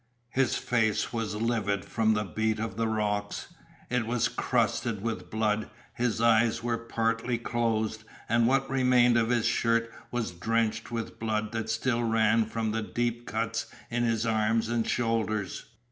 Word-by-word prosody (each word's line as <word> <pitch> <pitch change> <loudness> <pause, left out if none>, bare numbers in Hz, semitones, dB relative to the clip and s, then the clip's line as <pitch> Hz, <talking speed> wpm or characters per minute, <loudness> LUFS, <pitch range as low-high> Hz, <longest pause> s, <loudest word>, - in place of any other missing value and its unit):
His 130 -2 +2
face 110 -3 0
was 115 -2 -2
livid 105 -4 0
from 110 -1 +2
the 105 - 0
beat 110 +2 -1
of 110 -3 -3
the 115 +1 0
rocks; 105 -2 -2 0.4
it 125 -3 +1
was 120 0 +1
crusted 110 -4 0
with 115 -1 -3
blood; 110 -1 0 0.2
his 120 -1 0
eyes 115 0 +3
were 120 -1 0
partly 115 +1 -1
closed, 110 -2 -1 0.2
and 115 +1 +3
what 135 +1 +2
remained 125 -2 +4
of 115 -1 +2
his 120 -2 +2
shirt 115 0 +1 0.2
was 120 -7 -2
drenched 110 +5 -1
with 115 -2 -5
blood 110 -1 -1
that 110 -1 -3
still 120 +1 0
ran 115 0 +3
from 110 0 -2
the 110 +1 -1
deep 120 +2 -2
cuts 115 0 -2 0.2
in 120 0 0
his 115 -1 +1
arms 110 0 +1
and 115 -1 0
shoulders. 110 -5 -1
115 Hz, 160 wpm, -28 LUFS, 110-120 Hz, 0.4 s, remained